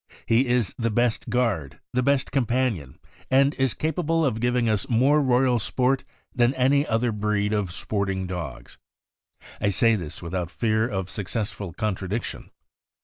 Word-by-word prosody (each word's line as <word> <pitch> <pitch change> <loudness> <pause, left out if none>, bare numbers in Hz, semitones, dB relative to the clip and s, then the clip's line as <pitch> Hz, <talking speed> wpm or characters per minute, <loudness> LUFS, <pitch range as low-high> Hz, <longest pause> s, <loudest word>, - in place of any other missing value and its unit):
He 120 +4 +3
is 120 -4 +1
the 115 0 +1
best 120 +1 0
guard, 110 - -1
the 125 - +2
best 140 0 +1
companion, 120 - 0 0.3
and 135 +2 +4
/ll - - -19
is 135 -3 +1
capable 165 +1 0
of 115 -5 0
giving 120 0 +1
us 105 -3 0
more 135 +6 +4
royal 125 -2 +3
sport 130 +4 0 0.3
than 125 +1 +2
any 135 +3 +3
other 115 +1 +1
breed 105 0 0
of 105 -4 -1
sporting 95 0 -2
dogs. 80 -9 -7 0.8
I 105 - +2
say 115 +4 +3
this 85 -9 -4
without 85 0 -3
fear 110 +2 +1
of 95 -4 -3
suc 100 -3 -5
cessful 105 -5 -4
contradiction. 105 +1 -3
115 Hz, 155 wpm, -25 LUFS, 100-125 Hz, 0.8 s, and